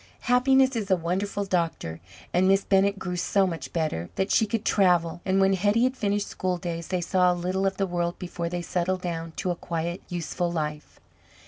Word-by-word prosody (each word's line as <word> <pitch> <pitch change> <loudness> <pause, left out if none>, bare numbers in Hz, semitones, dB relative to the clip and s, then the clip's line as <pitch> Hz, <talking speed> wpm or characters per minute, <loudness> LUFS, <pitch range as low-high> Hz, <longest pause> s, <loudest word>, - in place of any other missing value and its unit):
Happiness 260 +1 +4
is 210 -3 -2
a 190 - +5
wonderful 190 +4 -2
doctor 165 - -2 0.3
and 185 +2 +3
Miss 195 +1 +4
Bennett 200 0 +3
grew 180 -2 -4
so 195 +2 +2
much 170 -3 -4
better, 155 - -2
that 190 +1 -1
she 220 - +3
could 225 0 -2
travel, 175 -3 +2
and 190 0 +2
when 195 0 +4
Hetty 205 +5 +2
had 255 +1 +2
finished 205 -4 -1
school 185 -1 -2
days, 170 -1 -5
they 185 -1 -1
saw 180 +1 +3
a - - 0
little 185 +2 0
of 195 0 -2
the 195 - +1
world 175 -1 -2
before 175 -1 -4
they 175 0 -3
settled 180 +2 -1
down 165 -2 -4
to 180 - -2
a - - -2
quiet, 170 +1 -4
useful 175 0 -2
life. 150 -2 -4
180 Hz, 205 wpm, -26 LUFS, 170-195 Hz, 0.3 s, a